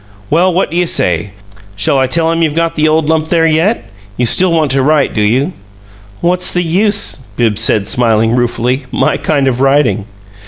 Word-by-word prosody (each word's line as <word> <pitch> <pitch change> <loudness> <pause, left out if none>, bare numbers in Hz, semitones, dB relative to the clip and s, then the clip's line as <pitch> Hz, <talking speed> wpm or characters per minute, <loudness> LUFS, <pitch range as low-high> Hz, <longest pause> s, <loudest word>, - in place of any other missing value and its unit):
Well, 175 +4 +3
what 180 -2 -1
do 170 - -3
you 175 -1 +1
say? 90 - 0 0.5
Shall 105 +7 0
I 130 - +1
tell 165 +4 0
him 165 0 -1
you've 155 -2 0
got 165 0 0
the 155 0 +1
old 155 0 +1
lump 160 0 0
there 165 -1 +1
yet? 165 +8 0 0.3
You 125 - +1
still 180 +9 +3
want 155 -4 +1
to 135 0 +1
write, 145 +1 +1
do 105 - -1
you?" 130 - 0 0.7
"What's 180 +1 +1
the 180 - -1
use?" 200 +5 +1 0.2
Bibbs 110 -4 0
said, 100 -2 +1
smiling 115 -1 +1
ruefully. 125 +2 -1
"My - - 0
kind 140 -3 0
of 130 -1 -1
writing!" 135 -6 +1
150 Hz, 195 wpm, -12 LUFS, 120-165 Hz, 0.7 s, Well